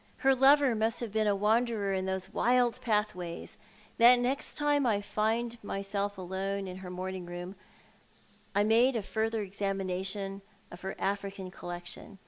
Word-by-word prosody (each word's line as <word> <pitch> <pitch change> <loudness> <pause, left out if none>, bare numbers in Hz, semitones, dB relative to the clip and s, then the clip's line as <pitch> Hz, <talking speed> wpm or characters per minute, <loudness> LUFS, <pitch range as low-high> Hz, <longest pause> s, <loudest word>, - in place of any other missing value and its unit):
Her 270 - +7
lover 270 0 +5
must 220 +1 0
have 235 -3 -4
been 215 0 +1
a 205 - +3
wanderer 215 0 +1
in 190 0 -1
those 190 -1 -3
wild 245 0 +2
pathways. 210 -7 -2 0.4
The 240 +2 +8
next 260 +4 -1
time 290 -1 +2
I 210 -3 +2
found 225 +3 -1
myself 200 0 -2
alone 190 +2 -3
in 185 0 -6
her 190 -1 -8
morning 185 0 -5
room 175 +2 -6 1.0
I 205 - +4
made 235 +4 +4
a 225 - -1
further 220 +1 -1
examination 195 0 -3 0.3
of 175 - -10
her 190 0 -4
African 195 -1 -3
collection. 175 +3 -7
205 Hz, 150 wpm, -30 LUFS, 190-230 Hz, 1.0 s, The